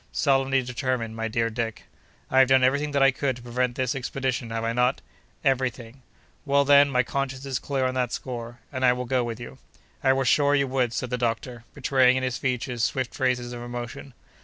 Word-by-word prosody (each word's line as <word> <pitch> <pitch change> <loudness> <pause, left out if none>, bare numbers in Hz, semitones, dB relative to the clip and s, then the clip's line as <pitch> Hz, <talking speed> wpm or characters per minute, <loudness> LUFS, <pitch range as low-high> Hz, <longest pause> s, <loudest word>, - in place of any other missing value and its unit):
"Solemnly 135 -2 +2
determined, 125 -2 -2
my 115 0 -2
dear 115 0 0
Dick." 115 -1 -4 0.5
"I 130 - +4
have 130 - +6
done 130 0 +4
every 130 +3 +3
thing 150 +1 -2
that 140 -1 +3
I 135 - +6
could 135 -1 -1
to 120 - -12
prevent 120 0 -1
this 130 0 0
expedition, 130 -2 -3
have 115 0 -3
I 115 0 0
not?" 125 +2 +2 0.4
"Every 130 -2 +2
thing!" 120 +2 -13 0.4
"Well, 140 -1 +2
then, 140 0 +6
my 125 -2 +2
conscience 135 +1 -3
is 135 -2 -2
clear 135 -2 -1
on 130 - 0
that 125 -2 -1
score, 120 -2 -6 0.2
and 130 -1 -3
I 125 -1 +6
will 125 0 -4
go 125 0 +1
with 115 -1 -5
you." 120 +2 -10 0.4
"I 130 -1 +5
was 135 -1 0
sure 145 -1 +4
you 140 -1 +2
would!" 130 -3 +1
said 125 +1 -4
the 125 - -1
doctor, 120 0 -3
betraying 130 -1 +3
in 130 - -2
his 130 +1 -2
features 125 -2 -2
swift 130 -1 -1
traces 125 -2 -1
of 120 - -7
emotion. 120 +1 -7
130 Hz, 220 wpm, -25 LUFS, 120-135 Hz, 0.5 s, have